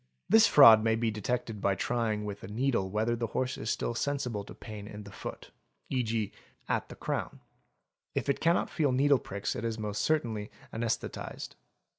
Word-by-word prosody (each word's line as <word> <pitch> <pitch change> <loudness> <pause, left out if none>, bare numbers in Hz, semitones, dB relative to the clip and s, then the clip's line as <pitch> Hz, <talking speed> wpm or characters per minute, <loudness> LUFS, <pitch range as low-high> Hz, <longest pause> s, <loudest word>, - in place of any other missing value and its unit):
This 225 +3 +7
fraud 115 -7 +9
may 110 0 +3
be 115 0 0
detected 110 0 -3
by 100 -1 +2
trying 110 0 -1
with 100 -1 -6
a - - -6
needle 115 -2 0
whether 110 +4 0
the' 115 0 -2
horse 130 +3 -1
is 110 - -4
still - - -1
sensible 125 -5 -2
to - - -11
pain 105 -2 -8
in 105 -1 -8
the 100 - -11
foot - - -8 0.4
(e.g., 115 -5 0 0.4
at - - -1
the - - -9
crown); - - -3 0.8
if - - -1
it 140 - +1
cannot 170 +2 +2
feel 145 -5 +1
needle 140 +1 +4
pricks 100 +1 -4
it - - -4
is 115 -1 -2
most 105 -2 -3
certainly 115 -9 0 0.2
anaesthetised. 115 0 -3
115 Hz, 180 wpm, -30 LUFS, 105-125 Hz, 0.8 s, fraud